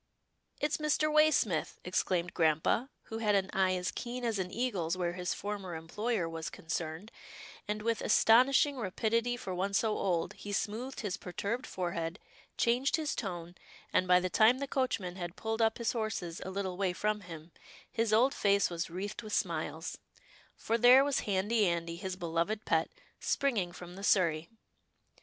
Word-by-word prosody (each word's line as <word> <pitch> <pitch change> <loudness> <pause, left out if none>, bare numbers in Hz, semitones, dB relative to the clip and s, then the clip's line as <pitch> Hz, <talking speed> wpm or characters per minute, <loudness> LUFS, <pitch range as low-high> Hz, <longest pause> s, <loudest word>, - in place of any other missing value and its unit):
" - - -37
It's 295 - +1
Mr. 305 0 +1
Way 305 0 +7
smith," 195 - 0
exclaimed 180 -1 0
grampa, 160 - +2
who 225 - -6
had 210 -2 +2
an 195 0 +1
eye 190 -1 +2
as 180 0 -2
keen 245 +1 -5
as 225 -4 0
an 180 -1 -2
eagle's 190 -7 -1
where 175 -1 -1
his 180 -1 -2
former 200 -4 -5
employer 185 +4 -2
was 165 -2 -5
concerned, 165 +5 -5 0.6
and, 210 0 -2
with 230 -1 0
astonishing 260 +6 +5
rapidity 230 +3 0
for 190 -5 -5
one 195 +2 -1
so 215 0 +2
old, 175 -4 0
he 205 - -7
smoothed 230 +7 -3
his 205 -5 -3
perturbed 200 +7 -4
forehead, 170 -1 -3 0.4
changed 245 +3 +2
his 310 -2 -1
tone, 175 -5 -5 0.4
and, 185 - +3
by 180 0 +6
the 185 - -1
time 225 +3 +5
the 280 +1 -3
coachman 225 -10 -1
had 175 -1 -5
pulled 225 +1 -2
up 225 0 +3
his 235 -2 0
horses 215 -7 -3
a 190 - -5
little 190 -1 -3
way 190 -2 0
from 210 +4 0
him, 165 -2 -10 0.4
his 230 -2 0
old 245 +6 +4
face 200 -5 +2
was 170 +1 -3
wreathed 195 +6 -5
with 215 -2 -7
smiles - - -2 0.3
— - - -27
for 230 +1 -1
there 250 +3 +8
was 285 -2 +1
Handy 205 +2 +2
Andy, 170 -1 -1
his 185 +2 -4
beloved 175 +5 -2
pet, - - +2 0.3
springing 220 -11 0
from 175 0 -10
the 195 - -9
surrey. 170 -5 +2
200 Hz, 175 wpm, -32 LUFS, 175-230 Hz, 0.6 s, there